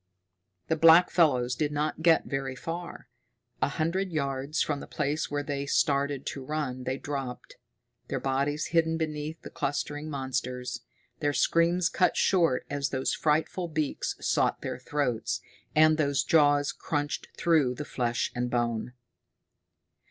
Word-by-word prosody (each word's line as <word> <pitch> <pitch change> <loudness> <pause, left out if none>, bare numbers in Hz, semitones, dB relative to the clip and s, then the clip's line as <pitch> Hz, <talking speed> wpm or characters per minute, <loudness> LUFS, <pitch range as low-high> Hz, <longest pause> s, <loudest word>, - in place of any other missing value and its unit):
The 160 - +2
blackfellows 160 -6 +5
did 150 +3 -1
not 150 +2 -2
get 165 0 +4
very 135 -2 -3
far. 165 0 -6 0.5
A - - +3
hundred 170 +6 -1
yards 140 -1 -1
from 145 -2 -2
the - - -9
place 150 +1 -2
where 145 0 -2
they 140 -1 -3
started 140 -2 +1
to 135 - -5
run 130 -3 -3
they 130 +1 -1
dropped, 135 -4 -6 0.5
their - - -2
bodies 140 +3 -1
hidden 165 -1 +3
beneath 155 0 -3
the - - -9
clustering 145 +2 -3
monsters, 125 -3 -3 0.4
their 145 -1 0
screams 170 +3 +3
cut 180 - +2
short 165 -9 +2
as 140 -1 -2
those 130 -1 -1
frightful 160 +4 0
beaks 155 -3 -2
sought - - +1
their - - -4
throats, 125 -7 -1 0.4
and 155 0 +5
those 140 -2 +2
jaws 145 -2 +4
crunched 145 -1 -3
through 150 -7 +3
flesh 125 -5 -2
and 125 0 -2
bone. 120 0 -1
145 Hz, 135 wpm, -28 LUFS, 135-160 Hz, 0.5 s, blackfellows